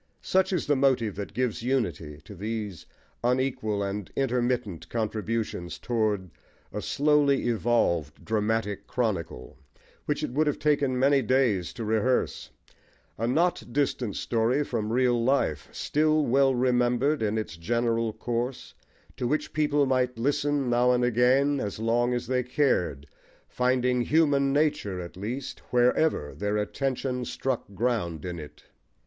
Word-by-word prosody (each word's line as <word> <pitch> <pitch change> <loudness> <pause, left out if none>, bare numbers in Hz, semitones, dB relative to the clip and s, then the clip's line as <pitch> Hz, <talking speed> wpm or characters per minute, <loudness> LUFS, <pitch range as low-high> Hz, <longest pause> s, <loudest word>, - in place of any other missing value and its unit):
Such 190 +1 +2
is 180 -4 0
the 145 - +2
motive 130 -6 +2
that 100 - -5
gives 125 -3 -1
unity 85 - -2
to - - -10
these 105 -2 -5 0.4
unequal 120 -5 0
and 100 0 -4
intermittent 120 - -1
contributions 110 -4 -3
toward 105 -6 -1 0.4
a - - -3
slowly 145 -1 +2
evolved 105 - 0
dramatic 110 -1 -1
chronicle, 95 - -3 0.5
which - - -1
it - - -2
would 150 +4 +1
have 150 - 0
taken 145 -4 +1
many 135 +2 +4
days 115 -7 +1
to 115 -3 -5
rehearse; 110 +4 0 0.7
a 115 - 0
not 170 +8 +2
distant 130 -5 -1
story 120 +5 +1
from 110 -5 -3
real 120 -1 +2
life 120 - 0
still 155 0 +1
well 135 +1 +3
remembered 125 +3 +2
in 110 0 0
its 110 -5 -4
general 115 +5 0
course, 120 +3 -4 0.4
to 125 - -1
which 150 +4 -1
people 150 -2 +2
might 125 -2 0
listen 145 +2 0
now 120 +1 +3
and 125 0 +1
again, 130 +4 +3
as 100 -4 -3
long 120 +2 +1
as 120 -1 -1
they 125 +1 +1
cared, 125 - 0 0.4
finding 125 0 +1
human 140 -1 +3
nature 145 -10 0
at 85 -1 -8
least 120 +8 -5
wherever 125 - +2
their 105 +1 -1
attention 125 +3 -2
struck 125 -2 -3
ground 95 -8 -1
in 90 -2 -4
it. 75 -1 -11
120 Hz, 140 wpm, -27 LUFS, 105-135 Hz, 0.7 s, many